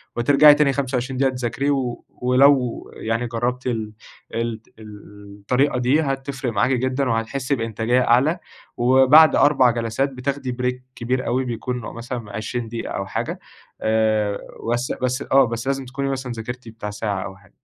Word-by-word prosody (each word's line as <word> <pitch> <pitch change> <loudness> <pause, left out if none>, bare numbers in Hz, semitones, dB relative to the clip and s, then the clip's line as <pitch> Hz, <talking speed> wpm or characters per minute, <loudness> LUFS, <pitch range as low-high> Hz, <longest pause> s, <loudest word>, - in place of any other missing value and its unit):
وترجعي 145 +5 +6
تاني 145 -2 +2
25 130 -1 -2
دقيقة 135 0 +2
تذاكري، 125 +3 -2
و 130 -4 -2 0.2
ولو 125 0 +3
يعني 115 +2 -2
جربتِ 120 +2 -2
ال 110 -3 -3 0.4
ال 115 -1 -3 0.2
ال 105 -1 -13
الطريقة 125 +6 +1
دي 130 +5 +2
هتفرق 135 -3 -3
معاكِ 105 +5 +2
جدًا 130 +1 0
وهتحسي 115 +5 -1
بإنتاجية 115 +1 0
أعلى، 135 +9 +3 0.4
وبعد 130 +6 +6
4 135 -4 +4
جلسات 115 +3 -1
بتاخدي 135 +1 -3
بريك 125 +1 -3
كبير 130 +2 -2
أوي 130 +2 0
بيكون 125 +1 -3
مثلًا 115 -1 -6
20 115 +2 -4
دقيقة 115 0 -5
أو 100 - -3
حاجة 95 - -4 0.4
آآ، 110 -2 +1 0.4
بس 120 +1 -1
بس 130 +1 -1
آه 135 0 +6
بس 115 +1 -5
لازم 135 -1 -1
تكوني 135 +2 -3
مثلًا 130 -2 -3
ذاكرتِ 120 +2 -7
بتاع 110 -2 -7
ساعة 105 -2 -3
أو 95 -1 -8
حا 95 -1 -22
125 Hz, 155 wpm, -22 LUFS, 115-135 Hz, 0.4 s, وترجعي